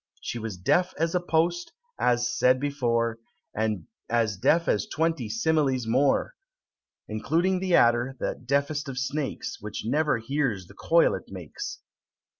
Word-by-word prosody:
She 120 - -5
was 110 -4 -5
deaf 180 - +1
as 165 +2 0
a 180 - +3
post, 175 0 0 0.3
as 120 -1 +2
said 130 +1 +4
before 120 -5 0 0.3
And 105 -6 -1 0.2
as 115 -3 +1
deaf 165 - +2
as 100 -1 +1
twenty 160 -8 -1
similes 135 +1 +1
more, 135 - +2 0.7
Including 165 - 0
the 185 -2 +2
adder, 120 +3 +3
that 125 - -4
deafest 140 +2 0
of 130 - -6
snakes, 135 +2 -3
Which 105 0 -6
never 150 +3 +2
hears 115 -5 -1
the - - -15
coil 170 0 +3
it - - -5
makes. 395 -1 -7
135 Hz, 145 wpm, -26 LUFS, 115-160 Hz, 0.7 s, said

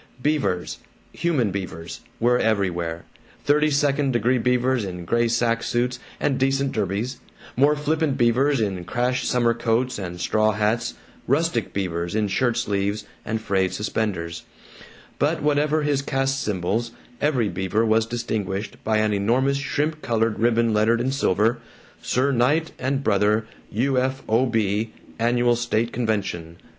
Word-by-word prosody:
Beavers, 140 - -1 0.3
human 140 - 0
Beavers, 85 -4 -6 0.2
were 125 +1 +3
everywhere: 90 -6 -1 0.4
thirty 150 +1 +3
second 140 -1 +1
degree 120 +2 +2
Beavers 125 0 +1
in 90 -3 -6
gray 120 +6 +2
sack 115 0 +1
suits 125 +2 -1 0.2
and 135 -3 0
decent 135 +1 +1
derbies, 110 +5 -2 0.4
more 145 +4 +4
flippant 150 -1 0
Beavers 125 +4 +3
in 95 -5 -1
crash 125 +5 -1
summer 120 -1 +2
coats 115 +1 0
and 90 -2 -6
straw 110 +4 +2
hats, 105 +3 0 0.3
rustic 140 - +1
Beavers 85 -2 -2
in 105 -2 +1
shirt 120 +4 +1
sleeves 100 -2 -1 0.2
and 110 0 -2
frayed 95 -4 0
suspenders; 95 -6 -2 0.8
but - - +1
whatever 150 +1 +2
his 145 -2 +1
caste 135 0 -1
symbols, 105 +4 -1 0.3
every 130 -7 +2
Beaver 95 +4 0
was 110 0 +2
distinguished 105 -4 -3
by 110 0 +1
an 110 0 +2
enormous 125 +7 +2
shrimp 150 +2 -1
colored 115 -1 0
ribbon 115 0 +2
lettered 110 +2 +3
in 130 +2 0
silver, 115 -3 +1 0.4
"Sir 130 +3 +1
Knight 145 +6 +2
and 135 +2 -1
Brother, 105 0 +2 0.3
U. 130 +4 +1
F. 130 +1 -2
O. 115 +4 +3
B., 110 -1 0 0.3
Annual 120 +1 +2
State 120 0 -1
Convention." 100 -8 -2
115 Hz, 140 wpm, -23 LUFS, 105-130 Hz, 0.8 s, more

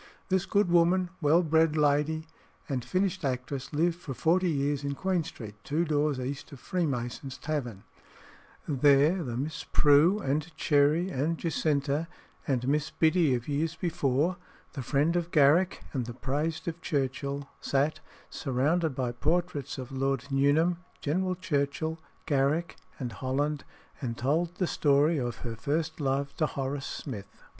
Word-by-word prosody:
This 190 0 +1
good 205 -2 +3
woman, 175 +1 +3
well 160 +4 +4
bred 160 -1 +3
lady, 150 +2 +2 0.4
and 130 -4 -2
finished 185 +5 -1
actress, 130 0 -3
lived 165 +3 +1
for 140 -6 -6
forty 180 +5 +2
years 145 -1 0
in 140 0 -2
Queen 185 +1 0
Street, 110 -9 -8
two 160 +4 0
doors 150 -3 +1
east 135 +4 -5
of 140 - -10
Freemasons' 135 -7 -3
Tavern; 125 -10 -4 0.8
there, 145 +5 +4
the 120 -6 -4
Miss 150 +3 -3
Prue, 150 +7 +5
and 155 -2 -2
Cherry, 150 +5 +3
and 160 +3 0
Jacinta, 150 -2 0 0.4
and 130 -3 0
Miss 150 +2 +1
Biddy 160 -4 +3
of 120 -1 -5
years 155 +3 -1
before, 165 0 0 0.4
the 140 - -4
friend 145 +6 +1
of 175 -1 0
Garrick 160 +4 +4
and 125 -5 -2
the 120 - -6
praised 150 +6 -2
of 170 +1 -4
Churchill, 140 0 -2
sat, 140 +3 0 0.3
surrounded 145 +3 0
by 125 -2 -1
portraits 150 +2 -1
of 130 0 -7
Lord 135 -1 -1
Nuneham, 145 +6 +3 0.2
General 185 +5 0
Churchill, 160 -1 -1 0.3
Garrick, 145 +4 +1 0.2
and 125 -3 -4
Holland, 140 +3 -1 0.4
and 120 -4 -3
told 165 +7 0
the 185 - 0
story 150 0 +3
of 120 -2 -2
her 115 -1 -3
first 155 +8 -2
love 140 0 -1
to 155 - +2
Horace 135 0 -3
Smith. 105 -8 -7
145 Hz, 150 wpm, -29 LUFS, 135-165 Hz, 0.8 s, Prue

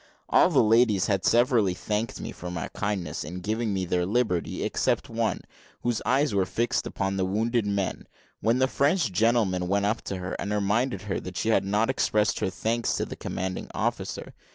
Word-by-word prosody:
All - - +5
the - - +4
ladies 110 -3 +4
had 100 -3 0
severally 120 -6 +3
thanked 105 +4 -2
me - - -5
for 90 - -7
my 90 -1 -4
kindness 100 -7 -3
in 90 +4 -6
giving 110 +3 -1
them 95 -2 -1
their 90 0 +1
liberty, 100 -3 0
except - - 0
one, - - -1 0.4
whose 120 -2 0
eyes 135 +1 +2
were 95 -2 +2
fixed 120 +5 0
upon 95 -1 -2
the 95 - +1
wounded 110 +4 0
men, 100 -2 -2 0.3
when 115 +2 +2
the 130 0 +3
French 140 - +1
gentleman 95 -3 +2
went 100 +2 +1
up 110 +2 0
to 95 - -3
her, 90 0 -5
and 100 - -3
reminded 105 +5 0
her 100 -2 -2
that 90 0 -8
she 110 - 0
had 100 -4 +3
not 105 +3 +1
expressed 110 -5 +1
her - - 0
thanks 115 +4 -1
to - - -1
the - - -7
commanding 95 0 -4
officer. - - -3
105 Hz, 195 wpm, -26 LUFS, 95-115 Hz, 0.4 s, All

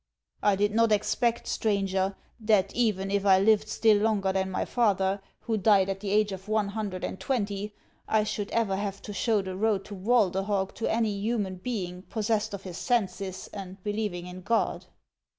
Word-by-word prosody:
"I 205 -1 +4
did 205 +1 +1
not 230 0 +3
expect, 235 +3 +1
stranger, 195 -2 0 0.2
that 210 -3 +2
even 205 -5 +1
if 200 -1 +1
I 190 -2 +6
lived 215 +1 +4
still 215 -1 +4
longer 205 -3 +1
than 190 0 0
my 185 - -1
father, 195 -4 +1 0.2
who 225 -2 -1
died 195 -2 +4
at 195 0 -2
the 200 0 -4
age 210 0 +2
of 190 +1 -7
one 215 -1 +1
hun 210 0 -3
dred 185 -1 -7
and - - -4
twenty, 205 -5 -2 0.3
I 220 -1 +3
should 210 0 -3
ever 220 -4 +1
have 200 -1 -4
to 205 - -6
show 210 +1 +1
the 190 -1 -5
road 205 -1 +1
to 210 - -9
Walderhog 195 -2 +1
to 225 - -1
any 225 -1 +1
human 200 -2 -2
being 180 -4 -4
possessed 215 0 -1
of 195 - -10
his 180 -2 -7
senses 195 -5 -1
and 190 -1 -8
believing 205 -4 -2
in 180 +1 -8
God." 230 +4 0
205 Hz, 185 wpm, -28 LUFS, 190-215 Hz, 0.3 s, I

